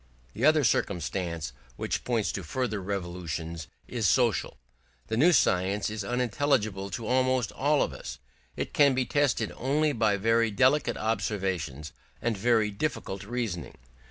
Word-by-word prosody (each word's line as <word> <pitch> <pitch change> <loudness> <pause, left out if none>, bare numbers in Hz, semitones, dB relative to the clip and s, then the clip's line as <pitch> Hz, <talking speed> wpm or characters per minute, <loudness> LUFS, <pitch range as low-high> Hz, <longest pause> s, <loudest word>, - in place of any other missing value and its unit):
The - - 0
other 155 -1 +5
circumstance 85 - -1 0.2
which - - -2
points 115 -4 0
to 95 - -4
further 110 +2 -2
revolutions 85 -4 -4 0.2
is - - 0
social. - - +2 0.5
The 110 - 0
new 165 +8 +6
science 100 - +2
is 110 -1 -4
unintelligible 120 -4 0
to 110 +4 -5
almost 130 0 +1
all 145 +2 +2
of - - -3
us; - - -7 0.4
it - - -4
can 140 -3 +5
be 130 0 +1
tested 125 -4 +1
only 150 +4 +1
by 110 -4 +2
very 115 +3 +2
delicate 135 +7 +2
observations 95 -9 -2 0.3
and 120 -2 -1
very 110 0 +2
difficult 100 -4 -3
reasoning. 100 - -4
110 Hz, 140 wpm, -28 LUFS, 95-125 Hz, 0.5 s, new